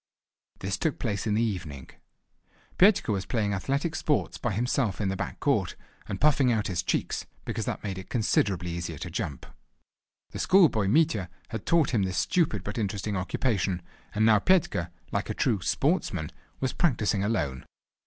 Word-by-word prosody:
This 95 0 -2
took 160 - 0
place 105 -3 -2
in 105 - +1
the 115 - +2
evening. 80 - -4 0.9
Petka 190 - +5
was 95 -2 -2
playing 105 -4 0
athletic 140 - -1
sports 150 -2 0
by 120 - -1
himself 115 0 0
in 100 -3 0
the 95 - -1
back - - -5
court, - - +1 0.3
and - - -4
puffing 145 -4 +4
out 110 -3 +1
his 90 -3 -1
cheeks, - - -1 0.2
because - - -3
that - - -3
made 95 -2 -3
it 95 - -10
considerably 95 -6 +1
easier 85 -2 -4
to - - -6
jump. 70 - -4 0.9
The - - -6
schoolboy 155 - +4
Mitya 125 - +2 0.2
had 110 -3 -6
taught 165 -4 +3
him 110 - +3
this 95 -1 -1
stupid 155 - +1
but 105 +4 -4
interesting 100 0 -2
occupation, 95 -2 -1 0.3
and 110 +1 +3
now 110 -2 +6
Petka, 150 - +2 0.2
like - - -2
a - - -2
true 100 -5 +1
"sportsman," 95 - 0 0.3
was 130 - -1
practising 110 - +1
alone. 85 - -1
105 Hz, 170 wpm, -28 LUFS, 95-130 Hz, 0.9 s, now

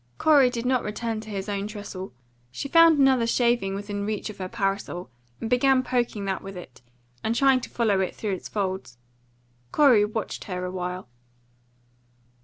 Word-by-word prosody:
Corey 285 -5 +5
did 240 -1 -4
not 255 -1 +2
return 220 +1 -3
to 220 - -11
his 195 -1 -4
own 200 0 -2
trestle. 205 -3 -7 0.4
She 130 - -5
found 330 +1 +6
another 265 -4 +4
shaving 235 -5 +1
within 205 0 -4
reach 215 +1 -3
of 205 - -16
her 185 -1 -4
parasol, 195 - -3 0.3
and - - -4
began 255 +2 +3
poking 240 -5 -1
that 190 -1 -2
with 195 -1 -8
it, 130 -8 -11 0.4
and 225 - 0
trying 270 0 +4
to - - -7
follow 215 -5 +1
it 190 - -1
through 210 -3 -3
its 185 - -6
folds. 190 - -3 0.7
Corey 260 -8 +5
watched 215 +1 -4
her 180 -2 -4
a 180 - -4
while. 180 -2 -4
210 Hz, 175 wpm, -25 LUFS, 195-245 Hz, 0.7 s, found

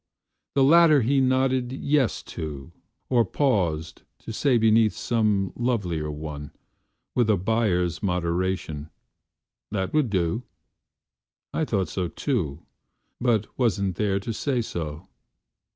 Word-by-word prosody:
The 135 - +5
latter 155 -1 +6
he 135 +4 +3
nodded 130 -1 +2
"Yes" 135 -1 0
to, 75 -1 -7 0.4
Or 120 -2 +4
paused 90 - 0 0.2
to 115 - -5
say 130 +2 +2
beneath 110 -1 +4
some 105 -5 0
lovelier 95 -11 -1
one, 75 -1 -6 0.6
With 120 -3 +2
a 105 - +4
buyer's 90 -4 0
moderation, 90 -4 -1 0.8
"That 95 -3 -2
would 150 -5 +2
do."I 100 - -5
thought 100 -9 0
so 90 -2 -2
too, 85 - -2 0.6
but 115 -4 +2
wasn't 100 -6 +1
there 100 0 0
to 115 +3 -4
say 130 +3 -1
so. 80 -2 -5
105 Hz, 115 wpm, -25 LUFS, 85-125 Hz, 0.8 s, latter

